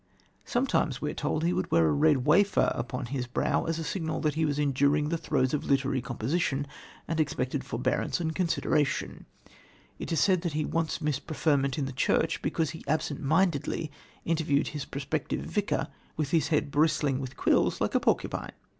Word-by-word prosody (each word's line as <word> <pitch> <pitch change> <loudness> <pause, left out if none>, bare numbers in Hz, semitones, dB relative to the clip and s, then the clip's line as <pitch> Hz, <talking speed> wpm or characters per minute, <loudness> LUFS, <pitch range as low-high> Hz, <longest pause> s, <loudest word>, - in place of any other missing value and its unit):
Sometimes, 240 - 0
we 150 - -2
are - - -7
told, 150 +1 -1
he 175 +2 +2
would - - -1
wear 85 -1 +4
a - - +3
red 145 - +3
wafer 195 +7 +4
upon 125 +1 -4
his 125 0 -3
brow, 125 - 0
as 165 0 -1
a 165 - -3
signal 160 -1 -2
that 150 -1 +1
he 160 +2 +1
was 145 -1 -1
enduring 145 +1 +2
the 170 - 0
throes 130 -5 0
of 150 - 0
literary 135 -1 +1
composition 135 +4 -1 0.4
and 165 0 -2
expected 135 -2 -1
forbearance 125 +8 -1
and 160 -2 -1
consideration. 160 -4 0 0.7
It - - -5
is 165 - +2
said 185 -1 +3
that 170 -4 -2
he 155 0 0
once 165 -1 -1
missed 150 -3 -2
preferment 145 -3 +1
in 145 - 0
the 135 - -4
church 155 +4 +1
because 155 0 -1
he 160 - -9
absentmindedly 155 +1 0 0.3
interviewed 155 -3 +1
his 150 -2 -5
prospective 140 +2 -3
vicar 205 -1 -1 0.3
with 150 -2 -1
his 165 -2 +2
head 150 -2 0
bristling 145 -3 +2
with 130 -2 -6
quills - - +2
like - - 0
a - - +4
porcupine. - - -1
150 Hz, 180 wpm, -28 LUFS, 140-160 Hz, 0.7 s, wear